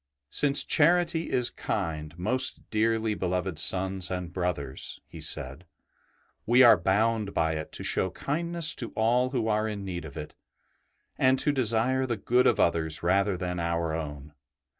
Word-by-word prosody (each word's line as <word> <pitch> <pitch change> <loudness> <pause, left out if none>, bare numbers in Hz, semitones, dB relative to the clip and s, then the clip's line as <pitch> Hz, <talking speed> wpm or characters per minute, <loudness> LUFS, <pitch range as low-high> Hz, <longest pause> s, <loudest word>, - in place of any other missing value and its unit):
'' 70 0 -59
Since 140 -1 +4
charity 170 +1 +2
is 125 -1 +1
kind, 80 -5 -4
most 130 +8 0
dearly 110 0 +1
beloved 90 -3 -2
sons 95 +1 +2
and 90 -2 -5
brothers," 85 -8 -4
he - - -12
said, 70 +7 -1 0.4
'' - - -40
we 125 +3 +6
are 120 -3 +8
bound 105 +3 0
by 80 -1 +1
it 80 -1 -6
to - - -7
show 95 - 0
kindness 170 - -1
to 120 - -5
all 120 +3 +2
who 120 -4 -2
are 110 0 0
in 105 -2 -5
need 85 -3 -5
of 70 - -10
it, 75 - -7 0.9
and 130 0 +4
to 145 - +1
desire 130 0 +1
the 120 -3 -2
good 125 +5 +2
of - - +2
others 80 -2 0
rather 95 +2 +1
than 90 0 -4
our 85 -1 -2
own. 75 -2 -6
100 Hz, 165 wpm, -27 LUFS, 85-125 Hz, 0.9 s, are